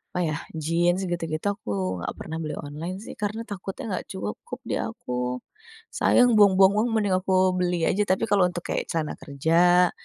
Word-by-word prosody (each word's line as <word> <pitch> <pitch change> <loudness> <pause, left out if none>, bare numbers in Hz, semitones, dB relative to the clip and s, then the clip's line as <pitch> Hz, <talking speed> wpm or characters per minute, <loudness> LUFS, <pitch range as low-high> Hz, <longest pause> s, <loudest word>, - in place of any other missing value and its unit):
apa - - -1
ya, 155 - -1 0.2
Jeans 170 +4 +1
gitu-gitu, 165 -2 -3
aku 95 - -3
enggak - - -4
pernah 160 - -6
beli 150 -1 -4
online, 165 +6 -5
sih. - - -8
Karena 210 +2 -2
takutnya 195 -2 -7
enggak 185 - -3
cukup 105 - -6
di - - -3
aku. 125 0 -3 0.5
Sayang 245 -3 +4
buang-buang 195 -1 +6
uang, 235 +3 +2
mending 205 -3 +2
aku 190 +1 -2 0.3
beli 180 -1 0
aja. 210 - +1
Tapi, 185 -1 +1
kalau 195 -3 +5
untuk 175 -1 -5
kayak - - -1
celana 160 -2 -1
kerja, 170 +5 +3
175 Hz, 175 wpm, -25 LUFS, 155-195 Hz, 0.5 s, buang-buang